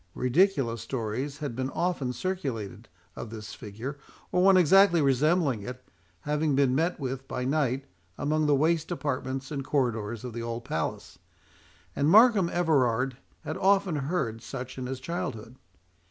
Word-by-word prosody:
Ridiculous 125 - +2
stories 130 +3 -3
had 140 -6 -5
been 130 +1 -2
often 155 -4 -1
circulated, 125 - -4 0.3
of 115 - -7
this 110 -1 -8
figure, 115 +7 -7 0.3
or 180 - +2
one 190 0 +6
exactly 185 +1 +6
resembling 140 - +2
it, 125 +4 -8 0.4
having 150 0 0
been 135 -2 +3
met 165 +6 0
with 135 -1 -4
by 125 - -3
night 135 -2 0 0.3
among 155 +1 0
the 145 - +4
waste 160 +2 +1
apartments 135 -4 -3
and 140 -2 -3
corridors 120 -5 -1
of 125 -2 -6
the 120 - -4
old 115 0 -5
palace; 80 - -4 0.8
and 140 +2 +2
Markham 210 -2 +6
Everard 130 -8 +1 0.3
had 155 0 -4
often 195 -4 +2
heard 135 -6 -2
such 130 +1 -7
in 125 - -4
his 130 0 -4
childhood. 130 -7 -5
135 Hz, 150 wpm, -28 LUFS, 125-160 Hz, 0.8 s, one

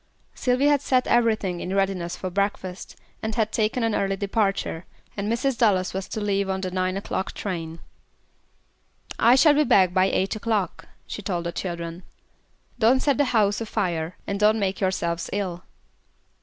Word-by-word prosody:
Sylvy 250 +2 +1
had 290 -1 +4
set 255 -2 +2
everything 215 -7 +1
in 185 +3 -3
readiness 190 -3 0
for 185 - -5
breakfast, 190 -1 -3 0.3
and 220 0 -3
had 220 -2 0
taken 225 +3 0
an 225 -1 +1
early 195 -1 0
departure, 195 -4 -1 0.3
and 205 +1 -2
Mrs. 255 +3 0
Dallas 190 -5 +2
was 190 0 -4
to - - -4
leave 200 -2 0
on 190 0 -1
the 185 -1 -3
nine 185 +1 -1
o'clock 190 -1 -3
train. 165 -4 -5 1.4
"I 235 +2 +6
shall 295 +3 +6
be 300 +1 +4
back 185 -9 +4
by 185 0 +4
eight 190 +1 0
o'clock," 215 -3 -2 0.2
she - - -6
told 180 -4 -2
the 170 - -2
children. 170 -1 -5 0.8
"Don't 240 +3 +5
set 285 -2 +1
the 285 - +4
house 215 -4 +2
afire, 180 -7 -2
and 200 0 -3
don't 215 +1 +4
make 195 -2 -1
yourselves 170 -3 -1
ill." 185 -3 -3
200 Hz, 170 wpm, -24 LUFS, 185-225 Hz, 1.4 s, I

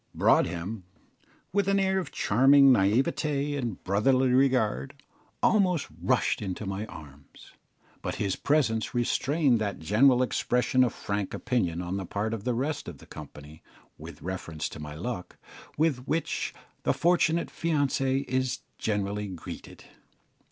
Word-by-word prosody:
Broadhem, 95 +4 +1 0.7
with 200 -1 +1
an 195 0 +3
air 190 0 +2
of 185 - -5
charming 135 +5 +5
naïveté 140 - +1
and 120 -8 -4
brotherly 130 +7 +2
regard, 125 - +2 0.5
almost 185 -7 +3
rushed - - +1
into 100 +1 -4
my 100 +3 -4
arms; 70 -5 -13 0.5
but - - -3
his 100 -2 -1
presence 125 -7 0
restrained 130 +2 +2
that 105 -2 -2
general 125 - +4
expression 125 +1 +1
of 120 - +1
frank 100 -1 -3
opinion 90 -9 -1
on 90 +2 -3
the 95 - -4
part 105 +4 -2
of 110 -3 -5
the 125 -2 0
rest 140 +6 -2
of - - -7
the - - -15
company, 75 0 -11 0.3
with - - -11
reference 85 -4 -4
to - - -10
my 75 0 -7
luck, 90 +2 -5 0.4
with 140 -5 +1
which 165 +1 -1 0.3
the - - +1
fortunate 170 -1 +2
fiancé 140 -4 0
is 130 0 -1 0.2
generally 105 -1 -1
greeted. 90 -4 -9
120 Hz, 135 wpm, -28 LUFS, 95-140 Hz, 0.7 s, charming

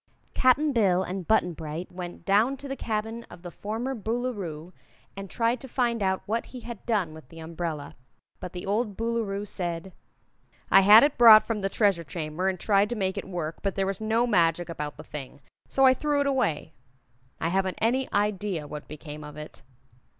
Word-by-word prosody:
Cap'n 275 +4 +3
Bill 190 -6 +3
and 185 -1 -5
Button 200 -5 +2
Bright 160 +2 -6
went 175 -1 -8
down 220 +8 +3
to 280 - -9
the 270 - -4
cabin 225 -1 -3
of 170 - -14
the 175 - -7
former 225 +9 -4
Boolooroo 205 -8 -4 0.4
and 195 0 -7
tried 230 +3 0
to 265 - -9
find 235 -3 0
out 190 -1 0
what 225 +3 -2
he 250 - -9
had 235 -2 -8
done 200 -9 0
with 155 -5 -13
the 165 - -14
umbrella, 160 -2 -5 0.4
but 180 - -7
the 180 -1 -7
old 205 +1 -1
Boolooroo 225 -3 -2
said: 175 0 -4 0.8
"I - - +8
had 210 +5 +9
it 285 -3 +1
brought 220 -2 +10
from 225 -3 -3
the 195 - 0
Treasure 195 -5 +2
Chamber 160 +4 -3
and 185 -2 -3
tried 200 +1 +2
to 240 - -2
make 190 -3 -1
it - - -5
work, 165 -3 -4
but 195 -1 -2
there 195 - 0
was 195 +1 -3
no 225 +2 +2
magic 175 -5 +2
about 150 -3 -5
the - - -9
thing. 145 -1 -8 0.3
So 270 - +3
I 260 - +7
threw 290 +2 0
it - - 0
away. 220 - 0 0.7
I 165 - 0
haven't 190 +1 0
any 255 +4 +1
idea 200 -6 -1
what 150 0 -8
became 150 0 -9
of 150 0 -10
it." 150 0 -10
195 Hz, 195 wpm, -27 LUFS, 170-230 Hz, 0.8 s, brought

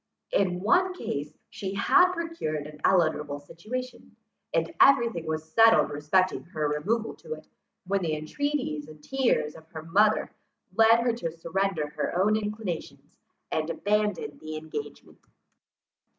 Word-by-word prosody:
In 180 -2 +1
one 365 - +3
case, 145 - -5
she 195 0 -5
had 365 - +5
procured 330 - -3
an 150 0 -11
eligible 155 -5 +2
situation, 215 +12 -7 0.4
and 165 0 0
every 270 -4 +6
thing 170 -7 -6
was 160 0 -4
settled 225 0 +6
respecting 155 +6 +1
her 155 -3 -2
removal 205 +11 -1
to 470 - -6
it, - - -11 0.4
when 195 +1 0
the 165 -3 -1
intreaties 155 - -2
and 155 -1 -14
tears 255 - +1
of 160 0 -14
her 160 -1 -8
mother 210 +6 +3 0.4
led 225 +1 +6
her 240 0 +1
to 225 -8 -3
surrender 165 -1 -2
her 160 +3 -2
own 210 +3 +4
inclinations, 210 -5 -5 0.4
and 155 +1 -1
abandon 210 +3 -1
the 155 0 -6
engagement. 150 -2 -8
185 Hz, 140 wpm, -27 LUFS, 155-225 Hz, 0.4 s, every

